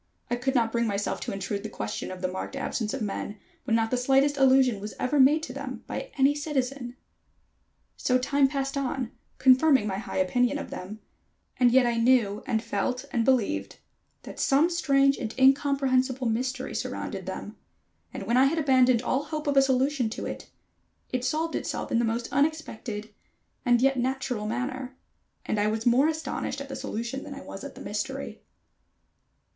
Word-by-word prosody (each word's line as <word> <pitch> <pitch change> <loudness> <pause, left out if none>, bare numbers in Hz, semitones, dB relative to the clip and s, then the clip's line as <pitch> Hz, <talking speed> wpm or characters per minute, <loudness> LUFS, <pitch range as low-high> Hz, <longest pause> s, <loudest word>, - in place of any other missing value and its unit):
I - - +3
could 260 +3 -1
not 230 -2 +2
bring 235 0 +1
myself 205 -1 -1
to - - -3
intrude 200 +1 -3
the 215 - -6
question 105 - -4
of 185 0 -8
the - - +2
marked 185 +8 -5
absence 230 -5 -2
of 270 -4 -3
men, 205 0 -4 0.3
when 225 - +2
not 225 -1 +1
the 250 - +2
slightest 270 +3 +3
allusion 265 -4 +4
was 210 +2 -7
ever 275 +3 +1
made 295 +4 +5
to - - -6
them - - -6
by - - -5
any 275 +1 +5
citizen. 275 -4 -3 1.0
So 255 - +2
time 275 +2 +2
passed 275 0 -2
on, 265 -3 -2 0.3
confirming 260 -1 +5
my 195 -2 -2
high 215 - -5
opinion 245 +9 +2
of - - -7
them, 205 +4 -7 0.6
and 250 -1 +5
yet 255 +1 +5
I 235 -1 +1
knew 230 -4 +3
and 220 -1 0
felt 250 +4 -2
and 235 -3 +1
believed 205 - +1 0.5
that - - -9
some 295 +6 +3
strange 275 -5 +3
and 225 -4 -5
incomprehensible 265 -1 +3
mystery 255 +3 -2
surrounded - - -4
them, - - -6 0.6
and - - -6
when 235 - +1
I 260 - +6
had 305 +5 +1
abandoned 255 -5 +4
all 270 +3 0
hope 310 -1 -4
of 285 -1 +1
a 275 - +7
solution 265 -2 +1
to 220 - -5
it, - - -6 0.6
it 255 -1 -1
solved 320 +4 -1
itself - - -3
in 230 - +3
the 235 - +2
most 230 +1 -1
unexpected 260 -8 -2 0.5
and 245 -1 +3
yet 270 0 +3
natural 250 -4 -2
manner, 255 +3 -4 0.5
and 210 - -1
I 205 - +2
was 220 +1 -2
more 250 +5 +5
astonished 315 -3 -3
at 275 0 -7
the 270 - -5
solution 235 +5 -4
than - - -8
I - - -8
was - - -9
at - - -8
the - - -11
mystery. - - -4
255 Hz, 185 wpm, -27 LUFS, 225-275 Hz, 1.0 s, a